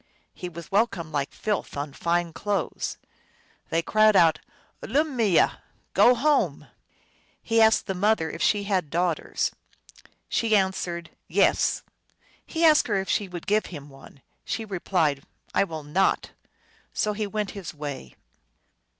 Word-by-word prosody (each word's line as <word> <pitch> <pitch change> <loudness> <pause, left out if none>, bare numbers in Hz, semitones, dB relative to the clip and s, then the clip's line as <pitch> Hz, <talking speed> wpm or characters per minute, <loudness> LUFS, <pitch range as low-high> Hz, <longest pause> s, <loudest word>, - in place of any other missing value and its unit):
He 180 - -6
was 170 -1 -10
welcomed 195 -6 +1
like 140 -1 -1
filth 210 -8 -3
on 145 0 -4
fine 170 +1 0
clothes. 200 -3 -2 0.7
They 165 +1 +1
cried 215 +2 +4
out, 165 -3 +5 0.2
" - - -36
Ulummeye! 250 - +2
" - - -38
" - - -43
Go 245 - +6
home! 290 +4 +1 0.4
" - - -37 0.3
He 225 0 +3
asked 220 0 +5
the 190 - -2
mother 195 -2 +2
if - - -7
she 205 -1 +2
had 190 -6 0
daughters. 170 +1 0 0.8
She 225 -2 +1
an 190 -2 +3
swered, 170 -3 -5
" - - -51
Yes." - - +3 0.6
He 330 0 +1
asked 310 -2 +6
her 210 - 0
if 190 - -4
she 205 - +1
would 175 -2 -8
give 215 +1 +1
him 145 -4 -9
one. 135 0 -16 0.2
She 225 - -3
replied, 170 -7 0 0.2
" - - -31
I - - +4
will 160 -4 -7
not." 175 +7 +1 0.6
So 210 - 0
he 210 0 -2
went 210 0 -3
his 195 -5 -7
way. 145 - -7
190 Hz, 160 wpm, -25 LUFS, 165-215 Hz, 0.8 s, Go